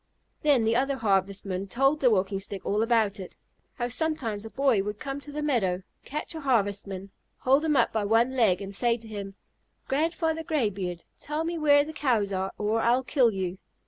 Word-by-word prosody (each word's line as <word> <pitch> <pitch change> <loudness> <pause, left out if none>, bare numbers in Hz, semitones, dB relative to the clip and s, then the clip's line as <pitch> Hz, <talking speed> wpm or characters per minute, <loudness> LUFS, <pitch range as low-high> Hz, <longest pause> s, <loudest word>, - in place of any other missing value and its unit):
Then 285 -6 +4
the 225 +1 +2
other 270 +3 +1
Harvestmen 195 -3 0
told 270 +8 +2
the 260 - +4
Walking 195 -2 +1
Stick 195 0 -7
all 210 +2 +1
about 225 -3 +2
it, 185 - -9 0.4
how 240 - -2
sometimes 245 -6 -2
a 225 - -7
boy 260 -5 +2
would 210 +1 -4
come 275 +3 -5
to 290 - -10
the 300 +1 -4
meadow, 195 -11 0 0.2
catch 300 +4 -5
a 320 - -6
Harvestman, 200 -6 -1 0.3
hold 270 +4 +3
him 310 -2 +2
up - - +3
by 220 -2 0
one 230 +5 +3
leg, 205 -6 +3
and 195 0 -7
say 235 +3 +1
to 225 -1 -13
him, 200 -2 -7 0.5
"Grandfather 320 +2 0
Graybeard, 205 - -2 0.2
tell 300 +2 -3
me 340 +1 -2
where 285 -2 +5
the 315 - -7
Cows 225 -10 +1
are, 190 0 -1
or 215 +2 0
I'll 240 +3 +3
kill 255 -2 +3
you." 190 -3 -3
230 Hz, 195 wpm, -27 LUFS, 200-275 Hz, 0.5 s, where